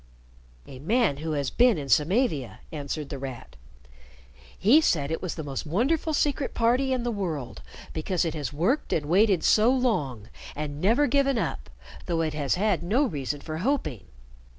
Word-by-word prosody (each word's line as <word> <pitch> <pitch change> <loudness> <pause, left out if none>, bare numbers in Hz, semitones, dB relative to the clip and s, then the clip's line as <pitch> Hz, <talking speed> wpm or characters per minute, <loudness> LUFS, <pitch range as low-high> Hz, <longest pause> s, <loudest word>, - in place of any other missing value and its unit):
"A 130 - -11
man 210 - +1
who 155 +1 -3
has 140 -2 -1
been 240 -5 +4
in 140 -2 -5
Samavia," 155 - +1
answered 150 -1 -5
The 140 - -5
Rat. 130 - -8 1.0
"He 250 +11 +5
said 150 - +1
it 160 - -2
was 180 - -4
the 160 - -5
most 140 -2 -4
wonderful 260 - 0
Secret 290 -2 0
Party 245 +3 +2
in 255 -2 0
the 240 - -1
world, 165 - -4 0.3
because 175 +3 -1
it 165 - -2
has 150 -3 -4
worked 180 - 0
and 150 - 0
waited 185 +2 +3
so 220 +2 +5
long, 150 - 0 0.3
and 150 0 -5
never 235 +10 +3
given 275 -1 +2
up, 115 - -3 0.4
though 165 -2 0
it 155 -2 -1
has 145 -3 0
had 195 -2 +1
no 215 +11 +1
reason 145 - -3
for 155 0 -5
hoping. 165 - -1
170 Hz, 175 wpm, -26 LUFS, 145-240 Hz, 1.0 s, He